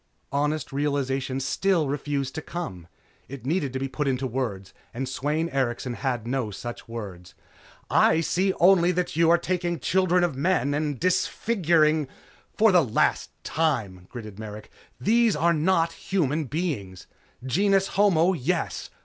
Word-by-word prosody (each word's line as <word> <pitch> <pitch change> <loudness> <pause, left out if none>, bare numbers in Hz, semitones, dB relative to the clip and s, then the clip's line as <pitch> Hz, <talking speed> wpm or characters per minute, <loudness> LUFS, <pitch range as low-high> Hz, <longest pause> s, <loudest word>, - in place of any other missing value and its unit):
Honest 145 +1 -1
realization 135 -2 -1
still 165 +4 +1
refused 140 -1 -2
to 160 - -4
come. 95 - -6 0.4
It 135 -2 -9
needed 150 -2 0
to 130 - -2
be 135 - -2
put 145 +2 -3
into 130 0 0
words, 110 -7 -4 0.2
and 130 +2 -3
Sweyn 150 +5 -1
Erikson 125 -3 -1
had 120 -2 -2
no 125 -2 -1
such 120 +4 -7
words. 95 -6 -8 0.5
"I 160 - +4
see 185 +4 +1
only 180 0 +5
that 180 -2 -2
you 165 0 +4
are 170 - +6
taking 175 -1 -2
children 180 +4 +2
of 175 -6 0
men 145 -2 +1
and 145 -2 -2
disfiguring 170 - +2 0.2
" - - -32
"For 220 -1 +5
the 180 -3 +5
last 115 -5 +1
time," 110 - -1
gritted 110 -4 -9
Merrick, 105 -1 -8 0.3
"These 230 +1 +3
are 170 +1 +3
not 165 +1 +2
human 155 -5 -1
beings. 125 - -4 0.4
Genus 195 +7 +2
homo, 190 -3 +3
yes. 145 -9 -2
150 Hz, 150 wpm, -25 LUFS, 130-175 Hz, 0.5 s, are